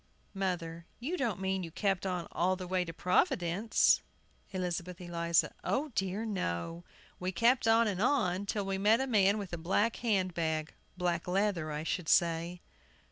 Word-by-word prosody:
MOTHER. 170 Hz, -4 st, -3 dB
You 290 Hz, +9 st, -2 dB
don't 235 Hz, -, -1 dB
mean 190 Hz, 0 st, -1 dB
you 170 Hz, -, -5 dB
kept 195 Hz, +2 st, -1 dB
on 180 Hz, -2 st, -2 dB
all 185 Hz, +2 st, +1 dB
the 185 Hz, 0 st, -6 dB
way 185 Hz, 0 st, 0 dB
to 165 Hz, -, -5 dB
Providence? 180 Hz, +4 st, +2 dB, 0.5 s
ELIZABETH 180 Hz, -2 st, -3 dB
ELIZA. 170 Hz, -1 st, +1 dB
O 295 Hz, +4 st, 0 dB
dear, 195 Hz, -2 st, -2 dB
no! 170 Hz, -, -3 dB, 0.4 s
We 185 Hz, +1 st, -2 dB
kept 230 Hz, +6 st, +3 dB
on 225 Hz, 0 st, +5 dB
and 195 Hz, -2 st, -1 dB
on, 205 Hz, -7 st, +1 dB
till 205 Hz, -1 st, -1 dB
we 195 Hz, 0 st, -2 dB
met 215 Hz, +4 st, +4 dB
a 265 Hz, -, 0 dB
man 205 Hz, -5 st, +3 dB
with 200 Hz, -4 st, -6 dB
a 175 Hz, -, -3 dB
black 200 Hz, +7 st, +1 dB
hand 195 Hz, -6 st, 0 dB
bag 160 Hz, -1 st, -1 dB, 0.2 s
black 175 Hz, -1 st, -1 dB
leather 185 Hz, -4 st, 0 dB
I 150 Hz, +1 st, -3 dB
should 165 Hz, 0 st, -2 dB
say. 170 Hz, 0 st, +2 dB
185 Hz, 170 wpm, -32 LUFS, 170-205 Hz, 0.5 s, on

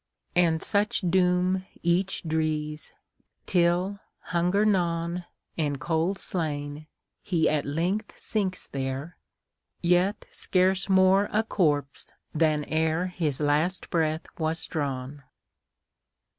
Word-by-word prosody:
And 170 Hz, -2 st, +3 dB
such 205 Hz, +1 st, +2 dB
doom 180 Hz, 0 st, +2 dB, 0.2 s
each 180 Hz, +3 st, +1 dB
drees, 155 Hz, -1 st, -2 dB, 0.5 s
Till, 180 Hz, +3 st, +2 dB, 0.2 s
hunger 180 Hz, +4 st, +1 dB
gnawn, 175 Hz, -3 st, 0 dB, 0.3 s
And 145 Hz, -3 st, 0 dB
cold 165 Hz, +5 st, 0 dB
slain, 150 Hz, -4 st, -3 dB, 0.3 s
he 170 Hz, -5 st, +1 dB
at 150 Hz, -2 st, 0 dB
length 180 Hz, +9 st, -2 dB
sinks 195 Hz, -4 st, -1 dB
there, 135 Hz, +4 st, -4 dB, 0.7 s
Yet 180 Hz, +4 st, +2 dB
scarce 185 Hz, +1 st, +1 dB
more 190 Hz, +1 st, +5 dB
a 215 Hz, +1 st, +2 dB
corpse 145 Hz, -10 st, 0 dB, 0.2 s
than 155 Hz, -1 st, +2 dB
ereHis 160 Hz, -1 st, 0 dB
last 155 Hz, +6 st, 0 dB
breath 160 Hz, -1 st, 0 dB
was 160 Hz, 0 st, -1 dB
drawn. 140 Hz, -2 st, -4 dB
170 Hz, 100 wpm, -27 LUFS, 155-185 Hz, 0.7 s, more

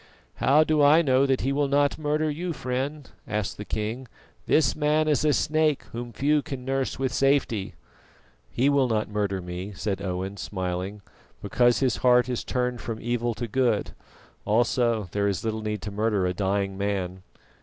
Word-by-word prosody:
"How 145 Hz, +4 st, +4 dB
do 155 Hz, -1 st, +2 dB
I 150 Hz, +4 st, +6 dB
know 135 Hz, -1 st, +3 dB
that 135 Hz, -1 st, +1 dB
he 135 Hz, -, 0 dB
will 145 Hz, 0 st, +1 dB
not 145 Hz, +1 st, +2 dB
murder 155 Hz, +1 st, 0 dB
you, 165 Hz, +4 st, -3 dB
friend?" 135 Hz, +2 st, -3 dB, 0.2 s
asked 105 Hz, -2 st, -2 dB
the 105 Hz, -, -6 dB
king. 110 Hz, +5 st, -4 dB, 0.4 s
"This 155 Hz, -5 st, +3 dB
man 155 Hz, +1 st, +2 dB
is 150 Hz, -1 st, +2 dB
a 155 Hz, -, +4 dB
snake 155 Hz, +2 st, +1 dB
whom 120 Hz, +1 st, -6 dB
few 145 Hz, +6 st, +2 dB
can 130 Hz, -3 st, -7 dB
nurse 135 Hz, 0 st, -1 dB
with 130 Hz, -1 st, -1 dB
safety." 135 Hz, -7 st, +1 dB, 0.7 s
"He 130 Hz, +3 st, +1 dB
will 140 Hz, -2 st, +3 dB
not 110 Hz, -3 st, -1 dB
murder 100 Hz, -3 st, -1 dB
me," 90 Hz, +3 st, -6 dB
said 100 Hz, 0 st, -3 dB
Owen 95 Hz, +1 st, -3 dB
smiling, 95 Hz, +1 st, -4 dB, 0.4 s
"because 120 Hz, +5 st, +2 dB
his 130 Hz, -4 st, +2 dB
heart 125 Hz, -1 st, +4 dB
is 125 Hz, -, -2 dB
turned 125 Hz, -1 st, -2 dB
from 115 Hz, -2 st, -4 dB
evil 120 Hz, 0 st, -1 dB
to 120 Hz, +1 st, -4 dB
good; 115 Hz, -2 st, +1 dB, 0.5 s
also, 115 Hz, -1 st, +1 dB
there 100 Hz, 0 st, 0 dB
is 100 Hz, 0 st, -2 dB
little 110 Hz, 0 st, -2 dB
need 105 Hz, -2 st, -3 dB
to 105 Hz, -, -5 dB
murder 105 Hz, -2 st, 0 dB
a 90 Hz, -, 0 dB
dying 95 Hz, 0 st, -1 dB
man." 95 Hz, -2 st, -2 dB
120 Hz, 175 wpm, -26 LUFS, 100-140 Hz, 0.7 s, I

